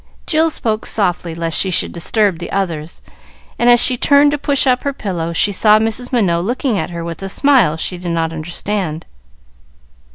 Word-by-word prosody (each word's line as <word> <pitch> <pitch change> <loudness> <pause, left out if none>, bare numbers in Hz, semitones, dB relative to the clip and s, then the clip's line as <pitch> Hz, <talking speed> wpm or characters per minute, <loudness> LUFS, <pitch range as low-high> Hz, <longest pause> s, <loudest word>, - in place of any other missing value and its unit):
Jill 320 +1 +2
spoke 220 -7 -2
softly 180 -5 -1
lest 165 -1 -2
she 190 - 0
should 180 - 0
disturb 190 +1 0
the 175 - -7
others, 170 -5 -4 0.6
and, 240 - +3
as 240 0 +6
she 250 +1 +4
turned 285 +3 +4
to 295 - -2
push 280 0 +1
up 255 -1 +2
her 280 - -2
pillow, 175 -9 -4
she 205 +4 +2
saw 210 +2 +4
Mrs. 225 +3 -2
Minot 180 -9 +1
looking 245 +3 -1
at 160 - -3
her 170 -1 -6
with 170 +1 -7
a 195 - -5
smile 240 - +3
she 180 +2 -3
did 175 -1 -5
not 165 -1 -1
understand. 170 +1 -4
195 Hz, 190 wpm, -16 LUFS, 170-245 Hz, 0.6 s, as